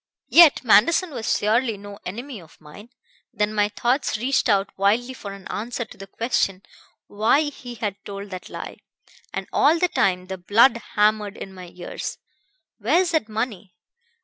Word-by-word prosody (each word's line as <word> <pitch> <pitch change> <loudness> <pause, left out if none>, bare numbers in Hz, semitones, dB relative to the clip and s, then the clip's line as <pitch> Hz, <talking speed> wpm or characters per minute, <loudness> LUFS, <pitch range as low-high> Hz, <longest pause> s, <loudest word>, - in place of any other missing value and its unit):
Yet 330 -5 +7
Manderson 320 - +4
was 230 -5 -1
surely 225 +1 +1
no 200 0 -11
enemy 235 +3 -7
of 165 -2 -19
mine. 160 +9 -14 0.4
Then 210 +1 -1
my 205 -1 +2
thoughts 240 +2 0
reached 260 +2 +1
out 200 -1 +1
wildly 220 +6 +1
for 205 -5 -8
an 195 -1 -10
answer 235 +3 -4
to - - -14
the 195 - -10
question 195 -3 -1 0.4
why 220 +8 +2
he 265 -5 -6
had 205 -3 -4
told 200 0 -8
that 185 -1 -7
lie. - - -7 0.5
And - - -5
all 310 +4 +4
the 360 +1 +1
time 180 - +1
the 190 0 -6
blood 230 +7 +4 0.2
hammered 210 -1 +2
in 195 - -8
my 185 -1 -10
ears: 180 - -6 0.6
'Where 255 - +3
is 360 -2 -1
that 310 -9 0
money?' 215 -4 -4
215 Hz, 170 wpm, -23 LUFS, 200-245 Hz, 0.6 s, Yet